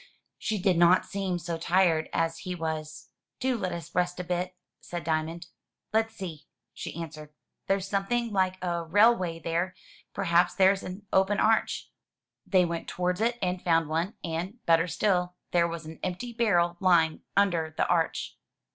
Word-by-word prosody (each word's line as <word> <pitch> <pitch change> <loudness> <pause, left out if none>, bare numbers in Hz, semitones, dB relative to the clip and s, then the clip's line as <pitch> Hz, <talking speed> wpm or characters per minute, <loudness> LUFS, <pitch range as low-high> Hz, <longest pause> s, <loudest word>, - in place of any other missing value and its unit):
She 215 - -1
did 180 -2 +2
not 175 +2 +5
seem 195 -3 -2
so 170 -1 -4
tired 170 -2 +2
as 165 0 0
he 180 -1 -4
was. 155 -2 -5 0.3
"Do 260 -1 +1
let 190 -5 -2
us 170 -2 -7
rest 180 0 0
a - - -2
bit,*' 180 +1 -2 0.2
said 175 -2 -6
Diamond. 160 +2 -2 0.5
"Let's 225 0 +1
see,'* 165 -6 -7 0.3
she - - -7
answered. 155 -2 -7 0.4
"There's 195 0 +1
something 210 +4 -1
like 185 -1 +1
a 170 -1 -1
rail 205 +8 +5
way 170 -5 -3
there. 170 +3 -2 0.4
Perhaps 175 -2 +2
there's 195 0 +4
an 190 +3 -8
open 190 +2 +3
arch." 220 0 +1 0.6
They 185 -2 +4
went 170 -1 -4
towards 180 +2 -1
it 235 +1 +1
and 180 0 -1
found 165 -3 +2
one, 165 +6 -1
and, 170 +6 -3
better 165 0 +4
still, 180 -1 0 0.2
there 170 -1 +3
was 165 -1 -6
an 160 +1 -9
empty 200 +7 -4
barrel 175 -7 +2
lying 170 -4 +3 0.2
under 170 -6 +2
the - - +2
arch. - - 0
180 Hz, 165 wpm, -28 LUFS, 165-195 Hz, 0.6 s, not